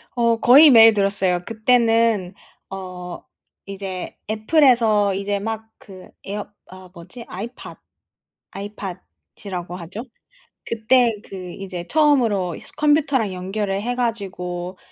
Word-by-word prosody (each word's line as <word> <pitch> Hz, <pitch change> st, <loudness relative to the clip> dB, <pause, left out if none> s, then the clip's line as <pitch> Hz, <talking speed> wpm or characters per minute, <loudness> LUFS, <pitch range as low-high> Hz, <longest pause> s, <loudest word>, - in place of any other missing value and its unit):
어 235 Hz, -1 st, +2 dB
거의 285 Hz, +6 st, +8 dB
매일 225 Hz, -3 st, +8 dB
들었어요. 195 Hz, -3 st, +1 dB
그때는 225 Hz, -4 st, +2 dB, 0.4 s
어 180 Hz, -2 st, -8 dB, 0.4 s
이제 195 Hz, -2 st, -7 dB
Apple에서 220 Hz, -4 st, +3 dB
이제 200 Hz, +1 st, -2 dB
막 220 Hz, +1 st, -5 dB
그 190 Hz, -2 st, -14 dB, 0.2 s
에어 205 Hz, +1 st, -5 dB, 0.2 s
아 185 Hz, 0 st, -13 dB
뭐지? 185 Hz, +7 st, -11 dB
iPod 225 Hz, +7 st, -8 dB, 0.7 s
iPod이라고 190 Hz, -2 st, -8 dB
하죠. 185 Hz, +6 st, -8 dB, 0.6 s
그때 235 Hz, +1 st, +2 dB
그 185 Hz, -2 st, -8 dB
이제 185 Hz, -3 st, -7 dB
처음으로 240 Hz, -, +2 dB
이스 -, -, -14 dB
컴퓨터랑 290 Hz, -8 st, +2 dB
연결을 195 Hz, +2 st, -3 dB
해 245 Hz, +3 st, -2 dB
가지고 185 Hz, -6 st, -4 dB
205 Hz, 265 characters per minute, -21 LUFS, 185-230 Hz, 0.7 s, 거의